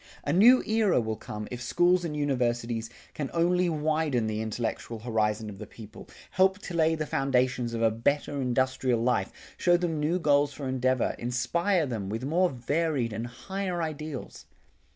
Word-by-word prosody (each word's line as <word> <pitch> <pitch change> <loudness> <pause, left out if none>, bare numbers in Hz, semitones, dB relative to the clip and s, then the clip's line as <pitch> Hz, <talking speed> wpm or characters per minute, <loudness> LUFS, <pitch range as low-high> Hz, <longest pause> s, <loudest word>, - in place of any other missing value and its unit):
A 145 - -1
new 235 +8 +7
era 215 - +2
will 110 -2 -2
come 105 0 -7
if 125 0 -5
schools 175 +8 +2
and 155 -3 -3
universities 120 -5 -1 0.2
can 145 -3 -4
only 175 +1 +2
widen 155 -5 0
the 110 0 -2
intellectual 115 +1 -3
horizon 110 -1 -1
of 100 -2 -9
the 110 - -8
people, 110 0 -12 0.2
help 190 +1 +3
to 200 -3 -8
lay 160 -1 +3
the 155 -1 -3
foundations 125 -4 0
of 115 - -1
a 115 - +4
better 140 +5 -1
industrial 130 -1 +1
life, 120 -6 +1 0.3
show 175 -1 +4
them 170 -3 -2
new 155 +4 +1
goals 145 -4 +2
for 135 0 -6
endeavor, 130 -1 0
inspire 170 +9 0
them 110 -7 -4
with 110 +4 -4
more 175 +5 +2
varied 135 -2 -1
and 115 +3 -4
higher 180 +9 -4
ideals. 155 -3 -6
135 Hz, 170 wpm, -28 LUFS, 115-165 Hz, 0.3 s, new